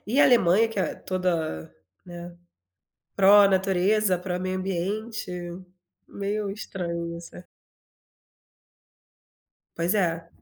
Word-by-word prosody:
E 255 Hz, +7 st, +2 dB
Alemanha 230 Hz, -6 st, +5 dB
que 225 Hz, -, -6 dB
é 170 Hz, -, -1 dB
toda, 170 Hz, -, -2 dB, 0.3 s
né, 175 Hz, -1 st, -9 dB, 0.8 s
pró 200 Hz, +1 st, +7 dB
natureza, 190 Hz, +1 st, +2 dB
pró 180 Hz, 0 st, -3 dB
meio-ambiente, 190 Hz, +3 st, -3 dB, 0.8 s
meio 200 Hz, +1 st, -3 dB
estranho 170 Hz, -4 st, -5 dB
essa. 175 Hz, +1 st, -11 dB, 2.3 s
Pois 170 Hz, +4 st, 0 dB
é. 170 Hz, -4 st, 0 dB
185 Hz, 85 wpm, -25 LUFS, 175-205 Hz, 2.3 s, pró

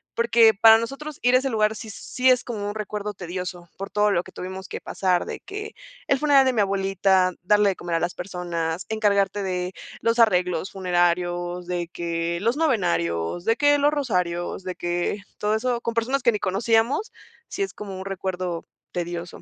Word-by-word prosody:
Porque 230 Hz, -1 st, +5 dB
para 225 Hz, +2 st, +7 dB
nosotros 275 Hz, +6 st, -6 dB
ir 245 Hz, +1 st, +4 dB
a -, -, +7 dB
ese 270 Hz, +1 st, -2 dB
lugar 215 Hz, -2 st, +2 dB
sí 220 Hz, 0 st, -8 dB
sí 255 Hz, +5 st, 0 dB
es 255 Hz, -1 st, +4 dB
como 210 Hz, -4 st, -4 dB
un 205 Hz, -, -5 dB
recuerdo 210 Hz, -1 st, -4 dB
tedioso, 180 Hz, -1 st, -6 dB
por 195 Hz, +1 st, -6 dB
todo 210 Hz, 0 st, +3 dB
lo 175 Hz, -3 st, +1 dB
que -, -, -13 dB
tuvimos 190 Hz, +1 st, -7 dB
que -, -, -6 dB
pasar, 185 Hz, -2 st, 0 dB
de -, -, -6 dB
que 420 Hz, +2 st, -7 dB, 0.3 s
el 275 Hz, -, +3 dB
funeral 285 Hz, -2 st, +5 dB
de 260 Hz, -, +3 dB
mi 230 Hz, -, 0 dB
abuelita, 195 Hz, -1 st, +2 dB
darle 205 Hz, +2 st, +4 dB
de 190 Hz, -, -1 dB
comer 175 Hz, -1 st, -3 dB
a -, -, +2 dB
las 175 Hz, +1 st, -1 dB
personas, 175 Hz, -2 st, -3 dB
encargarte 205 Hz, -2 st, +1 dB
de 180 Hz, -1 st, -2 dB, 0.3 s
los 230 Hz, +1 st, +1 dB
arreglos 180 Hz, -5 st, +2 dB
funerarios, 175 Hz, -1 st, 0 dB
de 175 Hz, -1 st, -2 dB
que 170 Hz, 0 st, -3 dB
los 230 Hz, +6 st, +1 dB
novenarios, 85 Hz, -, 0 dB
de 225 Hz, +1 st, +3 dB
que 290 Hz, 0 st, +4 dB
los 290 Hz, +1 st, +4 dB
rosarios, 180 Hz, -, -1 dB
de 185 Hz, -1 st, -5 dB
que 175 Hz, +3 st, -2 dB, 0.2 s
todo 210 Hz, +1 st, +1 dB
eso, 245 Hz, +2 st, 0 dB
con 235 Hz, -, -2 dB
personas 240 Hz, +4 st, 0 dB
que 240 Hz, -, +5 dB
ni 210 Hz, -, -2 dB
conocíamos, 225 Hz, -, +1 dB, 0.4 s
sí -, -, -5 dB
es 390 Hz, -, -4 dB
como 195 Hz, -2 st, -7 dB
un -, -, -5 dB
recuerdo 185 Hz, -3 st, -3 dB, 0.3 s
tedioso. 175 Hz, 0 st, -5 dB
195 Hz, 190 wpm, -24 LUFS, 175-230 Hz, 0.4 s, para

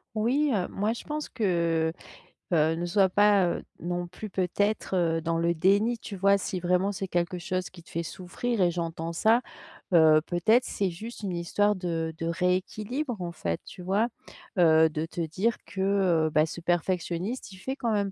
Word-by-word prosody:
Oui, 265 Hz, +7 st, +2 dB
heu, 185 Hz, -4 st, 0 dB
moi 210 Hz, +3 st, -1 dB
je 235 Hz, -, -6 dB
pense 300 Hz, 0 st, -4 dB
que 170 Hz, -7 st, +1 dB, 0.6 s
heu, 160 Hz, 0 st, +3 dB
ne 170 Hz, +1 st, -3 dB
sois 190 Hz, +1 st, +3 dB
pas, 205 Hz, -1 st, +4 dB
heu, -, -, -2 dB, 0.2 s
non 175 Hz, +1 st, -3 dB
plus 205 Hz, +4 st, -8 dB
peut-être, 195 Hz, +3 st, -1 dB
heu, 165 Hz, -2 st, +1 dB
dans 165 Hz, 0 st, -1 dB
le 170 Hz, 0 st, +1 dB
déni, 200 Hz, +7 st, +3 dB
tu 210 Hz, -, -8 dB
vois? 200 Hz, +1 st, +4 dB
Si 185 Hz, -1 st, -3 dB
vraiment 180 Hz, +3 st, +1 dB
c'est 195 Hz, -1 st, -4 dB
quelque 175 Hz, 0 st, -1 dB
chose 185 Hz, +1 st, -3 dB
qui 175 Hz, -2 st, -13 dB
te -, -, -20 dB
fait 170 Hz, -, -3 dB
souffrir- 190 Hz, +6 st, -3 dB
et 175 Hz, -, +4 dB
j'entends 165 Hz, -1 st, -3 dB
ça- 220 Hz, +8 st, +3 dB, 0.5 s
heu, 155 Hz, -2 st, +7 dB
peut-être, 215 Hz, +9 st, +3 dB
c'est 195 Hz, -3 st, -1 dB
juste 220 Hz, +6 st, -9 dB
une 190 Hz, -, -2 dB
histoire 205 Hz, +5 st, +1 dB
de 165 Hz, -3 st, -2 dB
de 165 Hz, -, -2 dB
rééquilibre 205 Hz, -, -1 dB
en 175 Hz, -1 st, -4 dB
fait, 85 Hz, -, -3 dB
tu 180 Hz, -, -10 dB
vois? 200 Hz, +6 st, +1 dB, 0.5 s
Heu, 160 Hz, -1 st, +6 dB
de 155 Hz, +1 st, -3 dB
te 170 Hz, -, -5 dB
dire 185 Hz, +9 st, 0 dB
que, 190 Hz, -1 st, -5 dB, 0.5 s
heu, -, -, -1 dB
bah, 155 Hz, +1 st, +3 dB
ce 170 Hz, +2 st, -7 dB
perfectionniste 175 Hz, +6 st, -1 dB
il 190 Hz, -, -12 dB
fait 265 Hz, +8 st, -4 dB
quand 240 Hz, -5 st, -1 dB
même 200 Hz, -2 st, 0 dB
180 Hz, 190 wpm, -27 LUFS, 170-205 Hz, 0.6 s, heu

